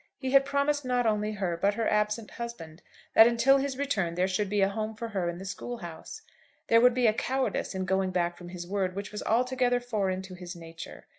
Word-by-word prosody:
He 265 -2 -3
had 275 0 +6
promised 280 +1 0
not 250 -1 0
only 210 -1 +1
her, 190 -4 -2
but 200 +4 +1
her 225 -1 0
absent 210 +1 0
husband, 175 -9 -8 0.3
that 225 - +9
until 240 +4 +4
his 270 -1 -2
return 200 -12 -1
there 180 +1 +2
should 190 +1 -1
be 205 0 +1
a 195 - +4
home 215 +2 -4
for 230 +1 -5
her 190 -5 -1
in 170 - -5
the 190 - -8
school 240 +5 -5
house. 175 - -9 0.5
There 230 0 +6
would 250 0 +5
be 250 -1 +2
a 215 - +5
cowardice 260 -3 -1
in 190 0 -2
going 190 +1 +1
back 175 -1 0
from 175 0 -11
his 175 -1 -7
word 190 -1 -2
which 200 0 -5
was 210 - -5
altogether 250 +1 +1
foreign 200 -6 -2
to 190 -1 -10
his 180 0 -8
nature. 165 -1 -10
210 Hz, 230 wpm, -28 LUFS, 185-245 Hz, 0.5 s, that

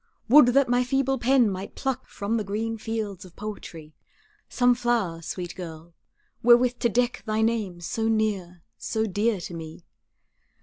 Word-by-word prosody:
Would 275 0 +8
that 275 -1 +5
my 245 +1 +2
feeble 270 +1 0
pen 250 0 +4
might 195 0 -5
pluck 265 -3 -3
From 205 +3 -2
the 215 - -1
green 220 +3 -3
fields 215 -4 -4
of 180 -2 -15
poetry, 165 -7 -8 0.6
Some 245 -1 +3
flower, 235 -9 -1
sweet 175 +1 -5
girl, 165 -2 -9 0.5
wherewith 245 +1 +5
to 235 - +2
deck 245 -2 0
Thy 215 0 +1
name 215 -6 -1
so 225 +6 -2
near, 200 -6 -1 0.2
so 220 -1 -1
dear 210 +1 0
to 175 - -7
me. 165 0 -9
220 Hz, 160 wpm, -25 LUFS, 185-240 Hz, 0.6 s, Would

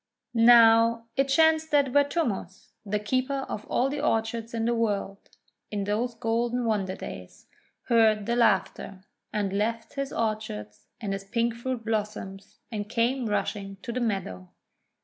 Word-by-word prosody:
Now 230 0 +6
it 275 - +3
chanced 320 +2 +3
that 285 -3 +3
Vertumnus, 280 - -1
the 210 0 -1
Keeper 255 +6 -1
of 215 - -5
all 255 - +1
the 285 +2 -3
Orchards 225 -3 -1
in 225 -1 -2
the 240 - +2
World 205 -3 -2 0.4
in 205 -1 -2
those 225 +4 -1
golden 235 +2 -1
wonder 200 -4 0
days, - - -9 0.4
heard 220 -3 +3
the 235 - 0
laughter, 195 -3 0 0.3
and 205 -3 -1
left 225 +3 -2
his 275 -1 -3
orchards 215 - -4
and 205 -4 -3
his 195 0 -5
pink 230 +3 0
fruit 235 0 -4
blossoms, 210 -3 -4
and 210 -2 -4
came 240 +2 0
rushing 200 -1 -2
to 240 - -4
the 250 - -2
meadow. 145 - -3
225 Hz, 150 wpm, -27 LUFS, 205-240 Hz, 0.4 s, Now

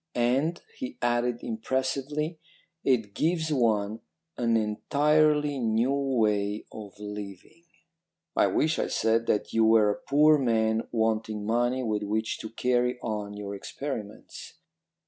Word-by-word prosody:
'And,' 135 +8 +1 0.2
he 265 0 -5
added 120 0 0
impressively, 135 +7 -2 0.4
'it 115 -6 +1
gives 160 - 0
one 110 -4 +1 0.4
an 115 -1 +2
entirely 150 +6 +2
new 115 +3 +1
way 110 -7 0
of 105 -3 -9
living.' 105 - -9 0.7
"'I - - +4
wish,' 160 +1 +1
I - - 0
said, 115 +1 +1
'that 105 - 0
you 115 - +3
were 110 -2 +5
a - - -5
poor 150 +2 +5
man 110 -3 +1
wanting 110 -2 -1
money 120 +3 +1
with 105 -3 -1
which 110 +2 -2
to 110 - -6
carry 125 +2 0
on 105 -2 -4
your 100 -1 -6
experiments. 105 0 -7
115 Hz, 125 wpm, -27 LUFS, 110-140 Hz, 0.7 s, were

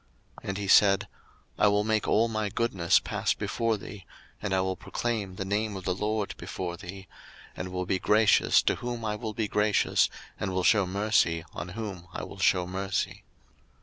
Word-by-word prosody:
02:033:019 - - -13
And 95 - -2
he 100 -1 -4
said, 100 0 +5 0.5
I - - +5
will 105 0 +3
make 110 0 0
all 115 +2 +3
my 110 -2 -2
goodness 100 -5 +2
pass - - -1
before 115 -2 -1
thee, 100 -3 -10 0.3
and 105 - -3
I 95 - +2
will 95 0 -1
proclaim 105 -5 -3
the 95 - -4
name 105 +1 -1
of 95 - -6
the 90 - +1
LORD 105 +2 -2
before 90 -2 -5
thee; 95 +1 -9 0.5
and 90 0 -5
will 90 0 -2
be 95 +1 0
gracious 105 +1 +4
to - - +1
whom 120 -2 -4
I 105 -1 -1
will 110 -1 -5
be 110 -2 -1
gracious, 105 0 +2 0.3
and 95 - -2
will 95 - 0
shew 100 -2 +4
mercy 95 -4 +1
on 90 - -6
whom 95 -6 -6
I - - -5
will 100 - -9
shew 90 -1 +3
mercy. 95 +2 -3
100 Hz, 190 wpm, -28 LUFS, 95-110 Hz, 0.5 s, said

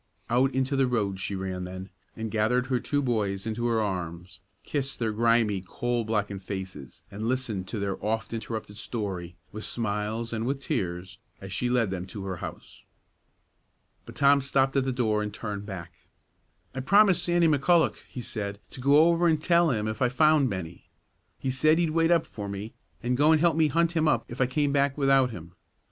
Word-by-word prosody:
Out 130 +3 +3
into 130 +1 0
the 135 -1 +3
road 105 -6 -1
she 100 +1 -3
ran 95 -1 -4
then, 95 +1 -7 0.2
and 110 -1 -5
gathered 115 +3 +1
her 125 -1 0
two 145 +4 -1
boys 105 -6 -1
into 115 +2 -1
her 115 -1 +2
arms, 90 -4 -4 0.2
kissed 135 -2 -3
their 115 -2 -1
grimy, 115 -3 +2
coal 120 +5 -2
blackened 105 -3 -2
faces, 95 -9 -7
and 105 +3 -4
listened 115 -7 -2
to 115 - -4
their 100 -1 -3
oft 110 +2 -2
interrupted 110 -2 -5
story, 95 -7 -4 0.2
with 110 +1 -7
smiles 110 +1 -2
and 115 +1 -2
with 135 +1 0
tears, 95 - -3 0.2
as 95 0 -8
she 125 +6 0
led 120 -5 +2
them 95 -1 -4
to 100 0 -7
her 95 -2 -4
house. - - -9 1.2
But - - -10
Tom 140 0 +5
stopped 135 0 +1
at 135 -1 +2
the 135 - 0
door 110 -4 +1
and 105 0 -3
turned 100 -1 -5
back. 90 -5 -7 0.8
"I 130 - -4
promised 190 +5 +5
Sandy 175 -1 +3
McCulloch," 160 +3 +3
he 125 - -6
said, 100 -3 -5
"to 130 - -8
go 145 +5 +6
over 170 0 +3
an' 160 -2 +3
tell 170 +2 +3
him 110 -4 0
if 110 +2 -4
I 125 - +4
found 155 0 +4
Bennie. 90 -4 -6 0.5
He 130 - -2
said 155 +5 +3
he'd 170 -2 +1
wait 165 +1 +2
up 170 -2 +3
for 105 -2 -7
me, 100 +3 -6 0.3
an' 120 +1 0
go 145 +5 +4
an' 160 - +6
help 165 0 +3
me 160 -1 +4
hunt 165 +3 +2
him 160 -2 +1
up - - +2
if 120 +2 -5
I 125 - +4
came 145 +2 0
back 140 0 +1
without 135 -2 +4
him. 85 -7 -9
115 Hz, 200 wpm, -27 LUFS, 100-140 Hz, 1.2 s, go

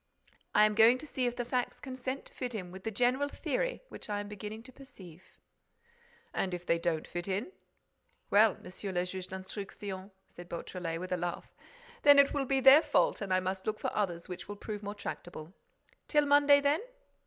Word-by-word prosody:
"I 210 - +7
am 215 - +2
going 225 +3 +6
to 270 - -9
see 260 -4 -1
if 240 - -2
the 245 - -3
facts 250 0 -2
consent 260 0 -5
to - - -13
fit 245 -2 -4
in 180 -4 -5
with 190 +1 -11
the - - 0
general 250 +6 +1
theory - - -2
which - - -9
I 205 -1 -1
am 205 - -5
beginning 210 +2 -7
to 260 - -12
perceive." 190 - -15 1.0
"And 185 -2 -1
if 175 0 -9
they 170 -1 +2
don't 165 -2 -1
fit 175 +1 -5
in?" 200 - -2 0.8
"Well, 210 0 +5
Monsieur 190 +2 -7
le 180 -1 0
Juge 185 0 -6
d'Instruction," 190 0 -7 0.2
said 175 0 -12
Beautrelet, 170 -1 -4
with 185 +1 -6
a 180 - +1
laugh, 175 0 -4 0.5
"then 285 0 +8
it 280 0 +6
will 280 -2 0
be 270 +1 +1
their 270 +4 +9
fault - - +2
and 200 -2 -4
I 185 0 +3
must 190 +2 -3
look 215 0 -1
for - - -3
others 175 -5 -1
which, 180 -1 -7
will 205 - -6
prove 210 0 -6
more 205 0 -5
tractable. 175 -4 -7 0.5
Till 295 -1 +3
Monday, 285 0 +6
then?" 285 +4 +2
205 Hz, 200 wpm, -31 LUFS, 185-255 Hz, 1.0 s, their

